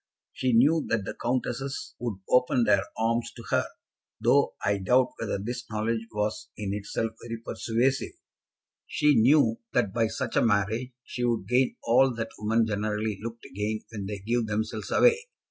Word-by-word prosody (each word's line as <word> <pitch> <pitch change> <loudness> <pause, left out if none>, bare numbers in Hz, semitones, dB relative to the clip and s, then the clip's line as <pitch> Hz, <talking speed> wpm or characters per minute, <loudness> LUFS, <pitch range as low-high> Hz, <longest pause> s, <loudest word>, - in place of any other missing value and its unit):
She 130 -1 0
knew 145 +7 +5
that 110 -4 0
the - - -4
countesses 130 +2 -3
would 115 -6 -4
open 125 -1 +3
their 100 -3 +4
arms 115 +1 0
to 115 - -10
her, - - +2 0.5
though - - +3
I 100 0 +2
doubt 125 +6 +3
whether 110 -3 -2
this 120 +5 -5
knowledge 110 +1 -1
was 105 0 -2
in 100 -2 -3
itself 105 +2 -2
very 115 -1 -5
persuasive. 120 +3 -1 0.7
She 150 0 +3
knew 115 -2 +4
that 95 - +1
by 115 -1 +2
such 120 +2 -4
a - - +4
marriage 110 +3 +1
she 125 - -5
would 115 -5 0
gain 125 +3 +2
all 125 +2 +4
that 115 0 -4
women 110 +2 +2
generally 105 -1 -2
look 115 +1 -7
to - - -11
gain 105 +2 -2
when 100 -3 -5
they 105 0 -4
give 115 +3 -1
themselves 110 +1 -3
away. 470 -1 +5
115 Hz, 170 wpm, -27 LUFS, 105-125 Hz, 0.7 s, knew